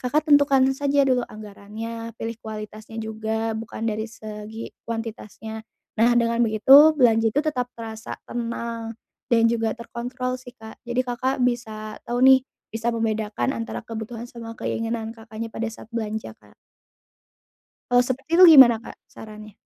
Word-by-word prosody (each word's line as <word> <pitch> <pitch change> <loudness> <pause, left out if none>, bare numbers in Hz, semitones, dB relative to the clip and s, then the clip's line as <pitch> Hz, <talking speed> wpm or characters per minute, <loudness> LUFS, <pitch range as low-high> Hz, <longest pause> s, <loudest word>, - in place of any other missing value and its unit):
Kakak 290 +5 0
tentukan 280 -2 +5
saja 280 +1 +2
dulu 255 -2 +2
anggarannya, 215 +2 -8
pilih 225 0 -5
kualitasnya 215 0 -8
juga 220 +1 -3
bukan 220 0 -6
dari 220 0 -2
segi 215 0 -8 0.2
kuantitasnya, 220 -1 -6 0.4
nah 235 +2 +5
dengan 235 0 +2
begitu 265 +8 +7
belanja 225 -4 +4
itu 290 - +3
tetap 255 -5 -1
terasa 225 -1 -7
tenang, 230 -1 -5 0.3
dan 230 -3 +3
juga 225 -1 -1
terkontrol 250 +2 -4
sih 250 -1 -13
Kak. 220 -1 -12
Jadi 245 +1 0
Kakak 255 +2 -1
bisa 220 -3 -3
tahu 245 +2 +1
nih, 265 0 +8 0.3
bisa 225 +1 -2
membedakan 220 +2 -1
antara 230 -3 -5
kebutuhan 230 +1 -6
sama 230 -1 -9
keinginan 225 0 -3
Kakaknya 225 0 -8
pada 230 0 -3
saat 225 0 -12
belanja, 220 - -4
Kak. 105 -1 -22 1.4
Kalau 245 0 +4
seperti 265 +4 -4
itu 345 -4 +10
gimana, 240 -5 +8
Kak, - - -11
sarannya? 215 -1 -12
230 Hz, 145 wpm, -23 LUFS, 220-245 Hz, 1.4 s, itu